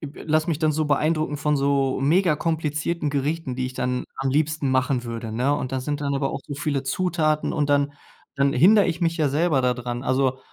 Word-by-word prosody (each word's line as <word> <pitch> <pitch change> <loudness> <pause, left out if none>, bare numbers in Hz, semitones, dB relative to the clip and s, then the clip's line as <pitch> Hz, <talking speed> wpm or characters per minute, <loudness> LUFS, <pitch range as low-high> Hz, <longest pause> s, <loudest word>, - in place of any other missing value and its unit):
be 145 -1 -9
lass 155 +1 +1
mich 160 -3 -1
dann 155 -2 +2
so 155 +1 0
beeindrucken 155 +1 +1
von 150 0 0
so 135 -1 +1
mega 165 +4 +3
komplizierten 155 0 -2
Gerichten, 145 -1 -2
die 130 0 -2
ich 130 - -8
dann 125 0 -2
am 135 0 -1
liebsten 150 -1 0
machen 130 -1 +1
würde, 115 -1 -5
ne? 125 +6 +1
Und 130 -2 -4
da 130 - -1
sind 145 +2 -3
dann 140 -1 -1
aber 135 0 -1
auch - - -5
so 145 - -5
viele 140 -1 -2
Zutaten, 155 0 0
und 150 -2 0
dann 145 0 +2 0.4
dann 140 0 +1
hinder 195 +9 +6
ich 175 +1 -2
mich 165 +1 0
ja 150 -3 +2
selber 150 -1 +2
da 125 -1 +1
dran. 120 0 -5
Also, 130 0 +1
145 Hz, 220 wpm, -23 LUFS, 130-155 Hz, 0.4 s, hinder